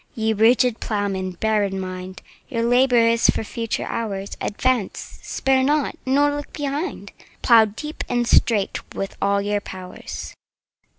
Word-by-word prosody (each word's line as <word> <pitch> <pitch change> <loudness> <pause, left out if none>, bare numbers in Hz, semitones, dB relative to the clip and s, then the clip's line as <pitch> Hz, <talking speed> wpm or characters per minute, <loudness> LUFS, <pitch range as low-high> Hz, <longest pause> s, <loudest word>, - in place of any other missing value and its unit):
Ye 220 -1 +1
rigid 235 +2 +3
Ploughmen, 195 -3 -2
bear 215 +3 +1
in 195 -1 -2
mind 185 0 -7 0.3
Your 230 -4 -1
labour 245 -1 +4
is 230 0 +3
for - - +1
future 230 +1 -3
hours: 200 -4 -4
Advance—spare 255 +3 -1
not—nor 290 0 +1
look 290 0 -6
behind— 290 +4 -4
15 - - -21 0.2
Plough 230 -2 +7
deep 300 +9 -6
and 240 -1 0
straight 210 -5 +3 0.2
with 195 - -4
all 200 0 +2
your 205 0 0
powers! 185 -2 -8
225 Hz, 135 wpm, -22 LUFS, 200-255 Hz, 0.3 s, Plough